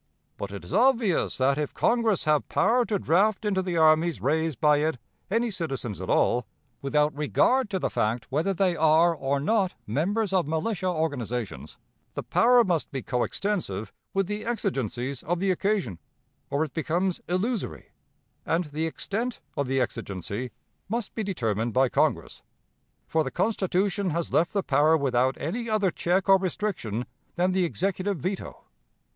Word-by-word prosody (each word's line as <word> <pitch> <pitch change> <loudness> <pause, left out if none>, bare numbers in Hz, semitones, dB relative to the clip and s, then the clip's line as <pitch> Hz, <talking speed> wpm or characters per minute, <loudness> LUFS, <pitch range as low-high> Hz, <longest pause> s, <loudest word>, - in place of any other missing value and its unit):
But - - -5
it 100 - -7
is - - -8
obvious 230 -4 +2
that, 135 +2 +2
if 150 - -3
Congress 230 -4 +2
have 150 -1 +1
power 245 +1 +3
to 205 -1 0
draft 195 +5 +2
into 195 -2 +1
the 180 -2 -2
armies 160 - +4
raised 155 - 0
by 150 -1 +4
it 155 -1 0 0.3
any 230 +3 +1
citizens 135 - -4
at 95 - -6
all 120 -3 +2 0.3
(without 150 +1 +1
regard 210 - +2
to 195 - -1
the - - -2
fact 115 +2 0
whether 155 +8 +1
they 185 -2 +1
are, 160 +2 +4
or 140 -2 -1
not, 190 +4 +1
members 195 - 0
of 180 -6 +2
militia 180 +5 -1
organizations), 125 - -3 0.4
the - - -3
power 245 0 +5
must 175 -7 0
be 135 -2 -4
coextensive 125 - -2 0.2
with 195 0 +1
the 210 +3 -4
exigencies 135 - -2
of 175 +2 -2
the 190 +1 +2
occasion, 185 - -1 0.5
or 140 +2 +1
it 155 - -6
becomes 170 +3 -1
illusory; 205 +5 -2 0.5
and 170 +2 +1
the 155 +2 -1
extent 225 +9 -3 0.2
of 140 - -1
the 135 +1 +1
exigency 105 0 -3 0.4
must 230 0 -3
be 225 - -3
determined 115 - -1
by 130 0 +3
Congress; - - 0 0.6
for 160 -1 +1
the 135 - -3
Constitution 195 +1 0
has 170 +1 -2
left 165 +2 +3
the 200 -2 0
power 150 +3 +4
without 130 -2 +1
any 230 +9 -3
other 210 -4 +2
check 185 +4 0
or 195 0 +6
restriction 175 - -2 0.3
than 180 +1 +2
the 185 -1 +2
Executive 190 +3 -1
veto. 185 +7 -5
170 Hz, 160 wpm, -26 LUFS, 140-195 Hz, 0.6 s, or